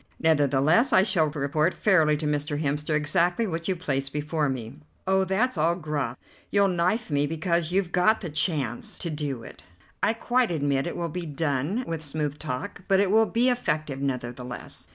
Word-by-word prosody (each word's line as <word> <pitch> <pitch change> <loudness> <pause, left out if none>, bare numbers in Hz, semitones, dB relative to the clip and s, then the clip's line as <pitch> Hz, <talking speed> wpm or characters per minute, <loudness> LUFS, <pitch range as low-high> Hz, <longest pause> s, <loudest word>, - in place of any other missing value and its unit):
Nevertheless 155 - +3
I 185 - +6
shall 170 -6 +2
report 150 +3 0
fairly 160 -7 +3
to 150 - -4
Mr. 145 0 -1
Hemster 150 +1 -1
exactly 175 +7 +1
what 165 -4 -3
you 190 - +1
place 135 -6 -2
before 150 +1 -1
me." 115 - -5 0.3
"Oh, 190 0 +2
that's 195 +2 0
all 165 +3 +3
guff. 150 -7 -3 0.3
You'll 200 -1 +3
knife 180 +4 0
me 145 0 +2
because 170 +1 -1
you've 185 -1 0
got 180 +5 +3
the 175 - -4
chance 145 - -1
to 170 - -4
do 145 -5 -4
it. - - -12 0.4
I 220 - +3
quite 245 +1 +1
admit 145 -4 0
it - - -4
will 170 - -2
be 170 +1 -5
done 150 - -1
with 165 -2 -4
smooth 150 -1 -3
talk, 130 +3 -5
but 195 -1 +4
it 200 -1 +2
will 220 +1 +5
be 235 +4 +2
effective 155 - -1
nevertheless." 125 -2 -5
155 Hz, 180 wpm, -26 LUFS, 145-185 Hz, 0.4 s, I